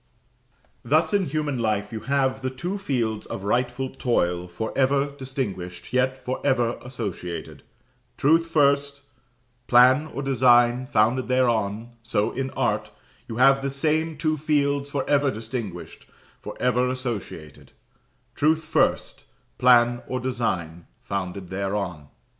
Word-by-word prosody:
Thus 155 - +2
in 200 -3 +2
human 145 -3 -2
life 110 -1 -1
you 110 - -3
have 135 +2 0
the 130 - -1
two 175 +10 -4
fields 115 - -2
of 95 - -6
rightful 125 +4 -1
toil 90 -9 0
for 90 +6 -5
ever 140 +1 +2
distinguished, 125 -10 -5
yet 130 +1 +1
for 130 0 -5
ever 120 -4 +1
associated; 105 -8 -6 0.6
Truth 165 +4 +3
first 140 -2 +2 0.7
plan 130 +5 +5
or 140 -2 -6
design, 125 -1 +4
founded 120 +2 +2
thereon; 120 -2 0
so 110 -1 0
in 135 0 -3
art, - - 0 0.4
you 115 - -6
have 135 +2 +5
the 140 - -1
same 155 +3 0
two 155 0 0
fields 140 -1 0
for 140 -2 -3
ever 145 -1 +3
distinguished, 110 -5 -6 0.3
for - - -8
ever 125 0 +2
associated; 115 - -6 0.6
Truth 160 +2 +2
first - - 0 0.3
plan, 120 -1 +5
or 130 - -2
design, 90 -10 -3 0.2
founded 95 -1 -4
thereon. 95 -5 -3
125 Hz, 130 wpm, -24 LUFS, 110-140 Hz, 0.7 s, plan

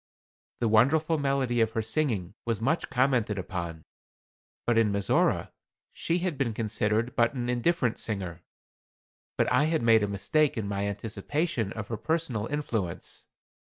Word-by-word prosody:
The 115 - +3
wonderful 150 +9 +3
melody 135 -4 +1
of 110 0 +1
her 110 - 0
singing 110 - -1
was 115 -3 -1
much 140 +9 0
commented 125 -6 +1
upon, 85 -4 -5 0.8
but 120 - +2
in 115 -2 +3
Mizora 100 -2 +1 0.4
she 170 - 0
had 175 -5 -2
been 120 -5 0
considered 110 +2 0
but 120 +2 +2
an 120 -1 -2
indifferent 125 -1 +1
singer. 90 -6 -3 1.0
But - - +3
I 150 - +4
had 160 -4 +1
made 115 -1 +6
a 105 - +1
mistake 135 +9 +1
in 105 -3 -2
my 100 0 -1
anticipation 110 - -2
of 110 -2 -6
her 115 - -2
personal 145 -7 -1
influence. 115 - -3
115 Hz, 150 wpm, -28 LUFS, 105-140 Hz, 1.0 s, made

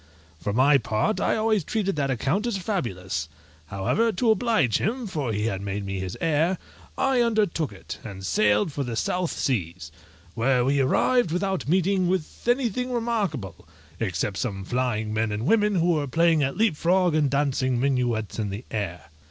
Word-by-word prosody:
For 100 - -2
my 135 +6 +5
part 115 - 0
I - - +2
always 215 -3 +1
treated 195 +1 -1
that 140 -2 0
account 140 - 0
as 230 -4 -1
fabulous: 95 - -3 0.4
however, 100 - +1
to 220 +3 +2
oblige 220 - +2
him, 235 +6 -1
for 150 - -2
he 105 0 -1
had 95 -4 -2
made 100 0 -4
me 95 -1 -3
his 95 -1 -5
heir, 165 +2 +1 0.4
I 265 -2 +2
undertook 210 - +1
it, 100 - -9
and 95 -3 -8
sailed 105 - +2
for 140 0 -3
the 120 -3 -4
South 180 +9 -1
seas, 90 - -2 0.4
where 125 +1 +2
we 140 +1 +2
arrived 240 - +3
without 190 -2 -1
meeting 185 +1 +2
with 180 +3 -3
anything 250 0 +1
remarkable, 200 - -2 0.3
except 95 -1 -2
some 100 -6 -3
flying 110 -1 -1
men 110 0 0
and 105 +3 -3
women 210 +2 +3
who 175 0 +3
were 150 -3 0
playing 165 +2 +3
at 135 -1 -1
leap 215 -6 +2
frog, 180 +2 +2
and 150 -2 +2
dancing 130 -3 +1
minuets 120 -5 0
in 105 -2 -1
the 100 +5 -6
air. 90 -8 -4
140 Hz, 175 wpm, -25 LUFS, -, 0.4 s, my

